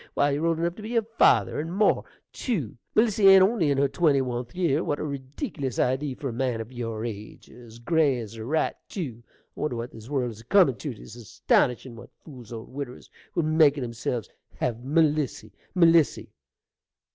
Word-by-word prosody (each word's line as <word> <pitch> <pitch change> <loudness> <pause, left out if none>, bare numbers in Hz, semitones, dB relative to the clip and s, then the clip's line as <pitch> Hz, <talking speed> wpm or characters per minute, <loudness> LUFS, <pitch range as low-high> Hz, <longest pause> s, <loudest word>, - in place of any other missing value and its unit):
Why, 145 0 +3
you're 150 +4 0
old 165 -1 +1
enough 170 +1 -1
to - - -8
be 225 +3 -5
her 230 - +3 0.2
father, 105 +1 +4
and 160 +3 -4
more, 205 +4 +2 0.3
tew; 175 - -3 0.2
Melissy 215 -3 +4
ain't 195 -1 +9
only 190 -6 +2
in 140 - +1
her 140 +1 +3
twenty 140 0 +2
oneth 120 -2 -4
year. 170 -3 +1
What 145 - -1
a - - -3
reedickilous 140 - -5
idee 130 +2 0
for 135 - -4
a - - -5
man 125 -1 -1
o' 115 - -4
your 115 -3 -4
age! 110 -2 -8
As 115 -2 -14
gray 145 +2 +2
as 110 -3 -7
a 110 -1 -7
rat, 155 +7 -1
tew! 130 - -5 0.3
I - - -12
wonder 150 -5 -1
what 115 +1 -5
this 110 +2 -12
world 130 -4 -1
is 110 0 -12
a - - -19
comin' 180 - +5
tew: 145 -6 -5
'tis 110 - -12
astonishin' 120 - 0
what 115 - -12 0.2
fools 125 -7 -12
old 115 +2 -8
widdiwers 135 -3 -7 0.2
will 170 - +1
make 155 -2 +4
o' - - -3
themselves! 120 -2 -3 0.3
Have 120 0 -3
Melissy! 150 -6 +1 0.2
Melissy! 165 -3 +3
135 Hz, 200 wpm, -26 LUFS, 120-160 Hz, 0.3 s, ain't